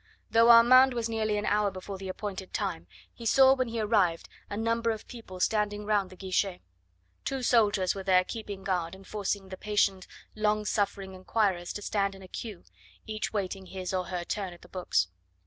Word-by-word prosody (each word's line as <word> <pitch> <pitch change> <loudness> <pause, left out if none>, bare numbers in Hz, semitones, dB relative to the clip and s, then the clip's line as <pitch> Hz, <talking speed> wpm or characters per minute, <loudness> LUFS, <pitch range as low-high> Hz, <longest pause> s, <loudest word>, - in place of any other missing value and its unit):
Though 230 +1 +5
Armand 250 +2 +8
was 235 -1 -1
nearly 220 -2 -1
an 205 - -2
hour 210 0 +2
before 190 +1 -7
the 190 -1 -6
appointed 190 -1 -6
time, 80 +2 -3 0.3
he 235 - -11
saw 265 +3 +6
when 255 -2 0
he 230 0 -3
arrived 205 -6 +2 0.2
a 205 - -4
number 230 +1 0
of 220 -1 -3
people 220 -6 -10
standing 210 +1 0
round 205 -3 +1
the 185 - -12
guichet. 190 0 -1 0.6
Two 270 -1 -3
soldiers 205 -6 +3
were 195 - -6
there 185 -1 +4
keeping 205 -2 -7
guard 180 -2 -1
and 195 0 -15
forcing 200 -1 -3
the 185 - -7
patient, 200 -2 0 0.3
long 215 0 0
suffering 200 -2 -1
inquirers 185 -2 0
to 205 - -6
stand 200 -1 0
in 195 - -12
a - - -11
queue, 210 0 -7 0.4
each 215 -1 -3
waiting 195 -2 -3
his 185 0 -5
or 185 -1 0
her 180 -1 -3
turn 190 0 -4
at 175 - -16
the - - -14
books. 100 - 0
205 Hz, 195 wpm, -29 LUFS, 185-220 Hz, 0.6 s, Armand